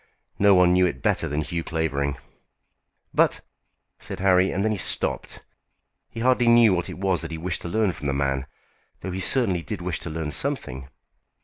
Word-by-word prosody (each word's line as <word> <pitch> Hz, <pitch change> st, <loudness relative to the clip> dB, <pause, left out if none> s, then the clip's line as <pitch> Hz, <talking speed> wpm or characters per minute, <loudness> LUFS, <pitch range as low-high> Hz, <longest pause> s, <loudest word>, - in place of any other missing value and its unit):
No 100 Hz, -1 st, +6 dB
one 90 Hz, -1 st, +5 dB
knew 90 Hz, 0 st, +4 dB
it -, -, -6 dB
better -, -, +1 dB
than 75 Hz, +2 st, -2 dB
Hugh 85 Hz, +1 st, -4 dB
Clavering." 70 Hz, -4 st, -2 dB, 1.0 s
"But -, -, +2 dB, 0.3 s
" -, -, -52 dB, 0.2 s
said -, -, -7 dB
Harry, 95 Hz, 0 st, +4 dB
and 100 Hz, +2 st, -1 dB
then 110 Hz, -, +1 dB
he 105 Hz, -, -1 dB
stopped. 85 Hz, -, -3 dB, 0.7 s
He 115 Hz, -, -7 dB
hardly 125 Hz, -1 st, +3 dB
knew 115 Hz, -3 st, +6 dB
what 90 Hz, -2 st, -1 dB
it -, -, -7 dB
was 95 Hz, -1 st, 0 dB
that 85 Hz, -, -6 dB
he 80 Hz, -, -5 dB
wished 85 Hz, +2 st, -2 dB
to 85 Hz, -, -6 dB
learn 110 Hz, +1 st, +1 dB
from 75 Hz, -3 st, -6 dB
the 70 Hz, -, 0 dB
man, 70 Hz, -1 st, -1 dB, 0.5 s
though 95 Hz, -, -5 dB
he 95 Hz, -, -4 dB
certainly 95 Hz, -3 st, +2 dB
did 105 Hz, +4 st, -6 dB
wish 90 Hz, -2 st, -3 dB
to -, -, -5 dB
learn 80 Hz, -1 st, -4 dB
something. 65 Hz, -, -2 dB
90 Hz, 200 wpm, -24 LUFS, 80-100 Hz, 1.0 s, No